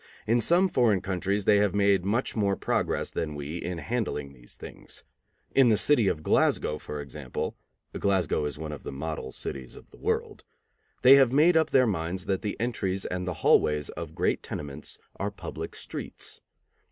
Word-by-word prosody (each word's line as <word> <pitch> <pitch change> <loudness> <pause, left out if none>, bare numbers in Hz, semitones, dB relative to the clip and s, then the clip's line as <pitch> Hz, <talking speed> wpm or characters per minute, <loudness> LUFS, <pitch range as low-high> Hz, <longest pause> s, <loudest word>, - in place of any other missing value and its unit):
In 115 +2 +3
some 175 - +4
foreign 115 - +2
countries 95 +2 -1
they 105 - +5
have 100 -1 +2
made 100 -2 +3
much 110 +7 0
more 100 -3 +1
progress - - -1
than 75 -2 -3
we 75 +3 -5
in 90 0 -4
handling 85 - -3
these - - -13
things. - - -8 0.5
In 135 -3 +6
the 110 - +4
city 115 +3 +3
of 75 -4 -1
Glasgow, 75 0 +2
for 75 - -6
example 70 -3 -5 0.4
(Glasgow 95 -6 +1
is 75 0 -4
one 80 0 -5
of 75 - -7
the - - -6
model 75 -1 -5
cities 65 -2 -7
of - - -15
the - - -16
world), - - -2 0.6
they 135 +2 +9
have 135 -3 +5
made 155 +6 +5
up 160 -1 +3
their 130 -1 +5
minds 90 -2 -2
that 95 -2 -1
the 105 - -3
entries 100 -5 -1
and 90 0 -3
the 90 - -1
hallways 75 -1 +4
of - - -7
great - - +1
tenements 75 0 -7 0.2
are - - -1
public - - -7
streets. - - -6
95 Hz, 180 wpm, -27 LUFS, 75-115 Hz, 0.6 s, they